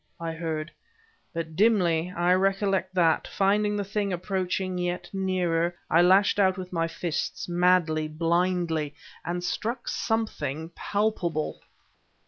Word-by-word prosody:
I 165 -1 -3
heard... 160 -1 -4 0.6
But, 165 -2 -5
dimly 180 -5 +3
I 175 +1 +3
recollect 195 -1 +1
that, 165 -3 +3
finding 205 +2 +1
the 205 - -1
thing 200 0 -2
approaching 185 0 -2
yet 175 0 -2
nearer, 175 -3 0 0.2
I 165 - +6
lashed 190 +3 +4
out 190 -1 +3
with 185 -1 -7
my 165 -1 +1
fists 165 -1 -3
madly, 175 -3 +2
blindly 165 -1 0 0.3
and 175 +1 -3
struck 235 +7 -3
something 160 - -2
palpable... 175 -5 -1
180 Hz, 120 wpm, -27 LUFS, 165-195 Hz, 0.6 s, I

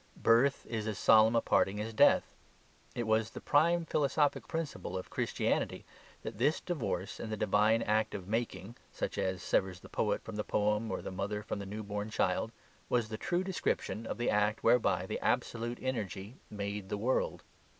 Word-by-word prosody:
Birth 125 +5 +3
is 110 -2 -3
as 110 - -2
solemn 110 +1 +6
a 115 - +4
parting 100 +2 +2
as 110 +2 -4
death. - - +4 0.6
It 120 - -2
was 110 0 +2
the - - -8
prime 165 +3 +3
philosophic 145 -1 +1
principle 150 - -4
of 90 - -7
Christianity - - -1 0.4
that - - -6
this 145 +6 +3
divorce 125 - -3
in 110 - -5
the 110 - -3
divine 105 +2 +3
act 110 0 +1
of 95 -3 -6
making 110 -1 -3
(such - - -3
as 95 -1 -1
severs 95 -1 0
the - - -13
poet - - 0
from 110 -2 -7
the 105 - -1
poem 105 +2 0
or - - -3
the - - -5
mother 100 +2 -3
from 105 -1 -4
the 100 - -6
new 105 +2 -5
born 105 +1 -4
child) 110 0 0 0.4
was 120 -3 +1
the 110 - -4
true 175 +9 0
description 115 - -2
of - - -3
the 120 - +1
act 105 +1 +1
whereby 125 - +3
the - - -3
absolute 120 +1 -1
energy 110 -2 -4
made 100 -1 -4
the 105 - -2
world. 120 +6 0
110 Hz, 185 wpm, -32 LUFS, 105-120 Hz, 0.6 s, solemn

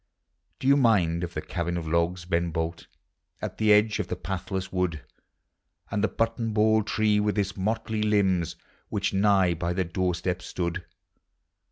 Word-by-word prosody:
Do 130 - -3
you 140 - +7
mind 90 -10 +3
of 85 0 -5
the 75 - -3
cabin 85 -1 -2
of 80 -2 -4
logs, 85 +2 0
Ben 85 0 0
Bolt, 80 +1 -3 0.5
At - - -6
the 110 -1 +4
edge 105 +1 +4
of 105 - -2
the - - -3
pathless 95 +1 -4
wood, 90 -4 -1 0.9
Aud 105 - 0
the 110 - +3
button 115 +1 -1
ball 110 +1 +4
tree 105 0 +1
with 105 0 0
its 100 -1 0
motley 110 +2 -1
limbs, 95 -5 +2 0.3
Which 100 -1 -1
nigh 95 -2 +4
by 85 +1 -2
the 95 +1 0
doorstep 90 +1 -1
stood? 90 0 -3
95 Hz, 165 wpm, -27 LUFS, 85-105 Hz, 0.9 s, you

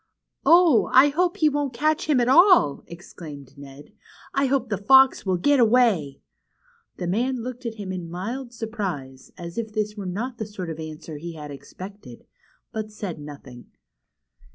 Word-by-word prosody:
Oh! 335 -8 +5
I 265 +3 +7
hope 350 +4 0
he 310 - +3
won't 285 -3 -2
catch 310 +4 0
him 285 -4 +4
at 240 - +2
all," 340 - +5
exclaimed 155 -5 -11
Ned. 140 +5 -13 0.4
I 275 0 +2
hope 265 -2 0
the 205 - -1
fox 265 +1 +5
will 185 -1 +2
get 285 +10 +3
away! 220 - +3 0.4
" 475 -1 -38
The 180 - -4
man 235 +7 -1
looked 250 0 -6
at 225 - -5
him 200 -3 -6
in 180 -3 -6
mild 235 +9 -5
surprise, 190 - -6
as 170 +4 -6
if 220 -2 -5
this 210 -1 -2
were 200 -3 -6
not 230 +7 -4
the 220 - -4
sort 185 -5 -6
of 160 - -8
answer 155 0 -8
he 170 +3 -7
had 150 -2 -9
expected, 140 - -11 0.5
but 215 -1 -5
said 200 -6 -6
nothing. 140 -4 -11
210 Hz, 175 wpm, -24 LUFS, 165-255 Hz, 0.5 s, I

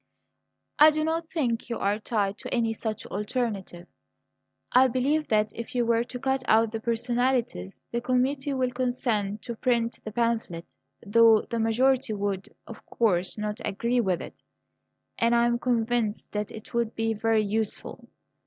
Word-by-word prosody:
"I 305 +1 +9
do 310 0 -1
not 325 +1 -1
think 245 -8 -1
you 235 - -2
are 205 +2 0
tied 205 -2 -1
to - - -7
any 230 -2 +1
such 220 -1 -4
alternative. 205 -4 -3 0.8
I 260 +1 +6
believe 275 +5 0
that 215 -1 +2
if 230 +2 -7
you 240 -1 +2
were 230 0 +2
to 250 - -7
cut 265 +1 0
out 220 0 +4
the 225 - -3
personalities 235 - -1
the 235 - -1
committee 265 +3 0
would 255 -2 0
consent 230 -5 -1
to 235 - -5
print 235 0 0
the 215 - -6
pamphlet, 225 -7 -2 0.3
though 225 +1 +6
the 235 - -1
majority 245 +2 +2
would, 200 -2 -3 0.2
of 230 - -11
course, 185 -5 0
not 210 +1 -4
agree 235 +5 0
with 185 -5 -1
it; - - -12 0.8
and 235 +1 +3
I 235 0 +4
am 240 0 +1
convinced 235 -3 -1
that 210 0 -3
it 215 - -11
would 235 -1 -1
be 225 0 0
very 220 0 +1
useful. 215 +1 -2
230 Hz, 165 wpm, -27 LUFS, 215-250 Hz, 0.8 s, I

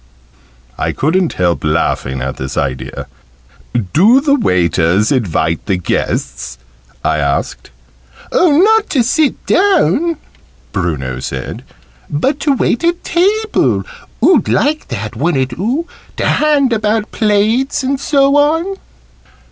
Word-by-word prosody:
I - - -1
couldn't 170 +4 0
help 90 -1 0
laughing 75 -4 -1
at 65 -1 -4
this 65 0 -5
idea. 65 -2 -3 0.9
"Do 215 - +5
the 280 0 +1
waiters 90 - +2
invite 85 - 0
the 95 - +1
guests?" 80 -6 -3 0.5
I 75 - +1
asked. 70 -1 -2 0.6
"Oh, 320 -5 +3
not 440 +1 +3
to 260 -5 +2
sit 285 +4 0
down!" 340 - +2 0.5
Bruno 70 -9 -3
said. 65 0 -6 0.5
"But 265 - -1
to 285 0 +1
wait 240 - 0
at 340 +1 0
table. 415 +5 +1 0.4
Oo'd 360 -5 +4
like 305 +2 0
that, 105 -2 -5
wouldn't 135 -2 0
oo? 245 - -2 0.3
To - - -1
hand 290 -5 +2
about 215 0 -1
plates, 220 +6 +1
and 270 +1 -1
so 280 0 +2
on." 325 +7 +1
215 Hz, 120 wpm, -15 LUFS, -, 0.9 s, Do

